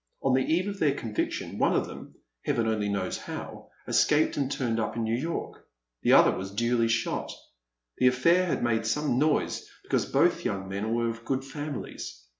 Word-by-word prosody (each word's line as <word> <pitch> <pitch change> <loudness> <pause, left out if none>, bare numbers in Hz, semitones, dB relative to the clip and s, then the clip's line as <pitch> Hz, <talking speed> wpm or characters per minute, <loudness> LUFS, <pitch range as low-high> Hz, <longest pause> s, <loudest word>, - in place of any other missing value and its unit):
On 135 - +3
the 130 - +4
eve 170 +8 +1
of 200 -1 -4
their 145 -3 +2
conviction, 110 -2 -3
one - - +3
of - - +2
them, - - -10 0.3
Heaven 115 -1 0
only 105 -2 0
knows 95 -2 -2
how, - - -8 0.2
escaped 150 +1 +3
and 140 -1 -1
turned 120 -5 -1
up 110 - -2
in 115 - -1
New 110 +1 0
York. 160 +7 -4 0.4
The - - +4
other - - +7
was 95 +1 -5
duly 115 +3 +1
shot. 115 0 -1 0.7
The 125 - +5
afiiair 170 +9 +4
had 170 - -1
made 110 -2 +1
some 140 +1 +1
noise, 155 +1 0
because - - 0
both - - +2
young 95 -1 -2
men 100 +4 -2
were 115 0 +1
of 115 0 -10
good 130 +2 -2
families. 135 - -6
120 Hz, 190 wpm, -28 LUFS, 110-145 Hz, 0.7 s, other